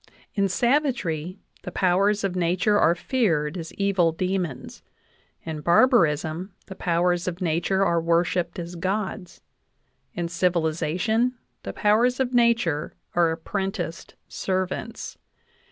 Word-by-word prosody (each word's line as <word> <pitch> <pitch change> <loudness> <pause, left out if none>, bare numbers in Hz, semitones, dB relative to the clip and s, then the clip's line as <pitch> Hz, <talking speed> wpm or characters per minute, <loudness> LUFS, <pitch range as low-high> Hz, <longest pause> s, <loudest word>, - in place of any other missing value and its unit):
In 200 -2 +1
savagery, 205 - 0 0.2
the - - -7
powers 200 +3 +2
of 190 -2 -1
nature 185 +4 +2
are 170 - +4
feared 170 - 0
as 165 -3 -6
evil 195 -4 +2
demons; 175 -6 -3 0.6
in 160 -2 -5
barbarism, 170 - +3
the 190 - -8
powers 175 0 0
of 180 -1 -3
nature 180 +3 +1
are 170 -2 +2
worshiped 170 +1 0
as 175 0 -6
gods; 190 +1 -3 0.7
in 175 -1 -2
civilization, 175 +7 0 0.3
the - - -5
powers 235 +4 +2
of 255 -1 0
nature 235 -11 +2 0.2
are 170 -1 +3
apprenticed 170 +1 -4
servants. 185 +4 -3
180 Hz, 115 wpm, -24 LUFS, 170-205 Hz, 0.7 s, are